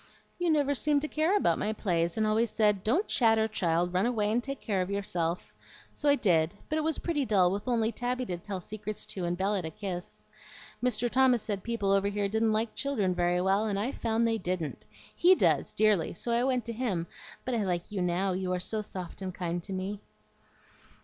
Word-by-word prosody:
"You 350 -1 +1
never 290 -3 +3
seemed 290 +1 +2
to - - -1
care 315 +7 +2
about - - +2
my 215 - 0
plays, 170 -5 0
and 220 - +2
always 220 +2 +2
said, 210 -3 +2
'Don't 320 - +1
chatter, 225 -2 +3
child; 175 -4 0
run 185 +5 +2
away 215 -4 0
and 240 +2 +1
take 275 0 -5
care 195 -4 -1
of 180 - -2
yourself.' 180 -4 -2 0.4
So 290 - 0
I 285 - +6
did; 170 - +2
but 310 - 0
it - - -1
was 320 0 0
pretty 315 -5 -1
dull, 190 -7 +3
with 205 +5 -4
only 230 -2 +1
Tabby 250 +1 -2
to 180 -5 -3
tell 190 0 -5
secrets 215 +1 -5
to 185 -3 -4
and 175 +1 -1
Bella 195 +1 0
to 160 - -4
kiss. 180 +1 -7 0.6
Mr. 245 -1 +1
Thomas 250 -2 +3
said 200 -3 -3
people 220 -3 -1
over 195 0 +3
here 200 0 0
didn't 220 +2 +1
like 220 +1 0
children 225 -10 0
very 175 0 +1
well, 195 +3 +2
and 200 -2 -1
I 220 +7 -1
found 230 -2 0
they 225 -1 0
didn't. 180 -4 -3 0.3
HE 365 +2 +6
does, - - +2
dearly, 210 -7 +2
so 235 - -2
I 235 +1 +2
went 255 -2 0
to 235 - -4
him; 215 -8 -1 0.4
but 255 - -2
I 225 -3 +1
like 180 0 -2
you 200 -3 -2
now, 180 +2 +1
you 185 0 -2
are 180 - -1
so 215 +4 -1
soft 185 -3 -7
and 190 -1 -3
kind 175 -1 -2
to 195 - -7
me." 190 +2 -3
210 Hz, 220 wpm, -29 LUFS, 185-240 Hz, 0.6 s, I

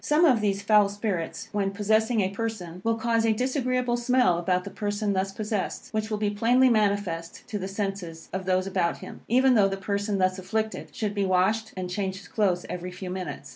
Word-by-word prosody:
Some 305 +3 +4
of 250 -8 +4
these 200 -1 0
foul 210 -1 +5
spirits, 200 0 -3
when 200 -2 0
possessing 215 +3 +2
a 190 - +1
person, 200 -5 -5
will 230 0 +2
cause 230 0 +1
a 225 -1 +3
disagreeable 255 0 0
smell 240 -7 +3
about 180 +1 +1
the 200 - -7
person 205 -1 -1
thus 190 0 0
possessed, 210 0 -3
which 215 0 -1
will 215 - -1
be 210 -1 0
plainly 245 +5 +4
manifest 200 -7 0
to 210 -4 -3
the 190 - -4
senses 195 -5 -4
of 190 0 -3
those 185 0 +1
about 185 -3 0
him, - - -10
even 260 +3 +4
though 205 -4 +5
the 195 0 -3
person 200 +1 -1
thus 185 0 +1
afflicted 220 +4 -3
should 210 -2 -2
be 200 -1 0
washed 195 +4 +1
and 185 -1 -3
change 190 0 -2
his 195 - -12
clothes 185 -5 0
every 180 0 -5
few 180 0 -7
minutes. 180 -6 -5
205 Hz, 210 wpm, -26 LUFS, 185-220 Hz, -, foul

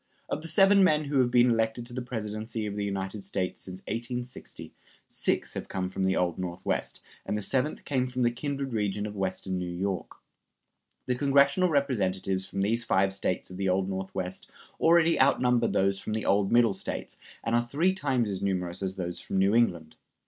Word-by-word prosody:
Of - - -2
the 165 - -7
seven 195 +4 +5
men 155 -4 +3
who 140 -1 +1
have 125 -1 +4
been 120 0 +5
elected 115 +1 0
to 120 - -8
the 130 - -3
presidency 110 -2 -4
of 100 -1 -4
the 105 - -2
United 100 0 -3
States 95 -1 -2
since 95 0 -8
1860, 120 +2 -6 0.3
six - - 0
have - - -5
come 95 -1 -3
from 95 - -1
the 95 - +2
Old 90 -1 0
Northwest, 90 -1 -3 0.2
and 105 - -2
the - - -2
seventh 135 +7 -1
came 130 -3 0
from 125 0 -1
the 120 - +3
kindred 140 +1 -4
region 105 -1 -1
of 105 0 -6
western 95 -1 -2
New 90 -1 -3
York. 95 +2 -3 0.9
The 125 - +1
congressional 140 +6 +3
Representatives 95 - 0
from 100 - -3
these 115 +4 +1
five 95 -2 +2
States 95 -1 -2
of 90 - -8
the 95 0 0
Old 95 +1 +1
Northwest 95 -1 -4 0.3
already 165 0 +4
outnumber 125 -3 +3
those 95 0 +1
from 110 - -4
the 110 - -2
old 100 0 +2
Middle 120 -3 +5
States, 95 - -5 0.2
and 115 - -1
are 120 - +4
three 150 +10 +1
times 135 - 0
as 100 -2 -3
numerous 90 -2 -2
as 95 -1 -2
those 90 -2 -4
from - - -4
New 95 +2 +3
England. 85 -9 +1
105 Hz, 195 wpm, -28 LUFS, 95-125 Hz, 0.9 s, seven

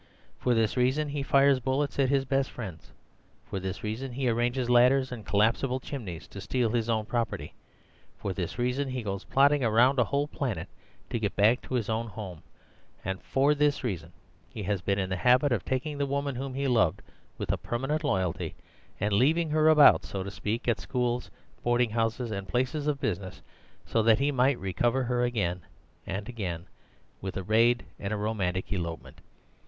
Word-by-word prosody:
For 125 -1 +2
this 115 +1 +1
reason 130 +5 +2
he 145 0 -2
fires 140 0 +4
bullets 135 +3 -1
at 135 -2 +3
his 135 -1 +2
best 135 0 +1
friends; 95 -9 -8 0.5
for 95 - -4
this 95 -1 -5
reason 120 +5 -4
he 130 +1 -1
arranges 120 +2 0
ladders 125 +2 +4
and 120 -4 -6
collapsible 115 +6 +2
chimneys 105 - -7
to 100 - -8
steal 120 +2 0
his 115 -1 0
own 110 -2 +1
property; 120 +1 -2 0.6
for 100 - -3
this 90 -2 -4
reason 125 +3 0
he 130 -2 -3
goes 100 -1 -4
plodding 140 +1 +4
around 125 +4 +4
a - - +6
whole 140 +6 0
planet 135 -8 -3 0.4
to 115 - 0
get 105 -2 -2
back 110 +5 +4
to 130 - -4
his 115 -4 0
own 115 +1 -1
home; 95 -6 -8 0.6
and 95 -1 -3
for 140 +2 +2
this 145 -1 +1
reason 85 -8 -3 0.4
he 105 - -6
has 100 -1 -1
been 100 +2 0
in 95 -1 -2
the - - +1
habit 125 +6 +4
of 115 -6 +1
taking 145 +3 -2
the 140 - +1
woman 140 0 -1
whom 130 +1 -5
he 140 0 -1
loved 115 -10 +2 0.3
with - - -2
a - - 0
permanent 135 +6 -2
loyalty, 95 - -1 0.4
and 105 +1 0
leaving 155 +9 +3
her 155 0 +4
about 150 -2 +7
(so 95 -1 -4
to 100 - -6
speak) 110 +4 -3
at 120 - +2
schools, 125 -1 -1 0.3
boarding 120 -1 +2
houses, 115 +1 -1
and 100 -2 -4
places 130 - -1
of 145 -2 0
business, 95 -5 -3 0.4
so 115 - +1
that 110 0 +5
he 140 +2 +1
might 130 0 +3
recover 120 +7 0
her 125 0 0
again 100 -8 -1 0.5
and 100 +2 -4
again 90 -8 -4 0.6
with 95 0 -4
a 95 - -3
raid 115 +4 +3
and 100 - -4
a 105 - 0
romantic 100 -3 -1
elopement. 85 -3 -5
120 Hz, 190 wpm, -28 LUFS, 105-135 Hz, 0.6 s, about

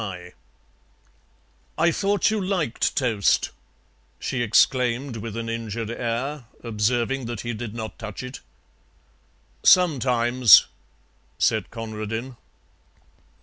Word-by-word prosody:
"I 170 +2 +3
thought 200 +4 +1
you 215 -2 -1
liked 180 - -1
toast," 115 -7 +1 0.7
she 130 - -3
exclaimed, 120 +2 +2
with 115 0 -6
an 115 0 -4
injured 115 -1 -4
air, 120 +4 -3 0.2
observing 120 +3 -1
that 120 -3 -5
he 120 0 -4
did 110 0 -6
not 110 -1 -6
touch 110 +1 -7
it. 125 +1 -8 1.2
"Sometimes," 125 - +5 0.7
said - - +1
Conradin. 115 +2 -5
120 Hz, 95 wpm, -24 LUFS, 115-130 Hz, 1.2 s, Sometimes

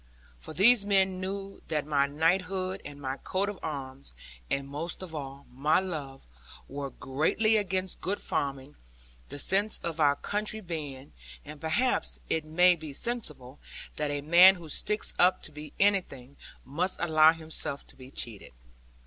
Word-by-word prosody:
For - - -6
these 225 +3 +6
men 190 -2 +2
knew 195 +1 -5
that 150 -3 -1
my 140 -2 +2
knighthood, 185 +5 0
and 145 -1 -9
my 135 -1 -4
coat 195 +6 -1
of 205 - -6
arms, 135 - -6 0.3
and 135 0 -1
(most 160 +6 -5
of 175 -3 -8
all) 140 -2 -7
my 150 +6 +3
love, 150 -8 -6 0.4
were 140 0 -5
greatly 155 +14 +1
against 190 -3 -1
good 200 +2 -2
farming; 140 0 -3 0.5
the - - -7
sense 200 +8 +1
of 165 -1 -3
our 145 -2 +4
country 210 +5 -2
being 150 -7 -7 0.3
and 150 0 -10
perhaps 160 - +1
it 160 -1 0
may 175 +3 +5
be 155 -3 -8
sensible 150 - -3 0.4
that 150 -1 -1
a 145 0 -2
man 175 +6 +8
who 170 -3 -11
sticks 210 +8 0
up 180 +1 +4
to - - -10
be 150 0 -9
anything, 175 -10 +1 0.3
must 170 +8 -1
allow 155 -2 +6
himself 160 -3 -2
to - - -18
be 130 -1 -13
cheated. 115 - -5
160 Hz, 155 wpm, -29 LUFS, 140-190 Hz, 0.5 s, man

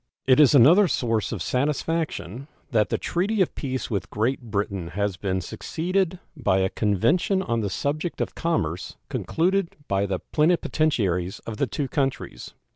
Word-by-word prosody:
It 130 +1 +5
is 150 -1 +7
another 165 - +7
source 115 -8 0
of 100 -8 -3
satisfaction 140 - -2 0.2
that 110 -4 +2
the - - 0
treaty 200 +5 -1
of 185 - +2
peace 130 -3 -4
with 100 -4 -2
Great 120 +6 0
Britain 100 -5 -3
has 100 -2 0
been 95 -1 -2
succeeded 185 - -2 0.2
by 125 -10 +1
a 95 0 +2
convention 160 - +1
on 115 -8 -1
the 105 -3 -1
subject 150 - -2
of - - -2
commerce 90 - -2
concluded 185 +2 0
by 100 +1 +1
the 95 -1 -1
plenipotentiaries 125 - +1
of 110 -2 -5
the 140 - +1
two 135 +5 -2
countries. 135 +1 -3
130 Hz, 155 wpm, -25 LUFS, 100-160 Hz, 0.2 s, is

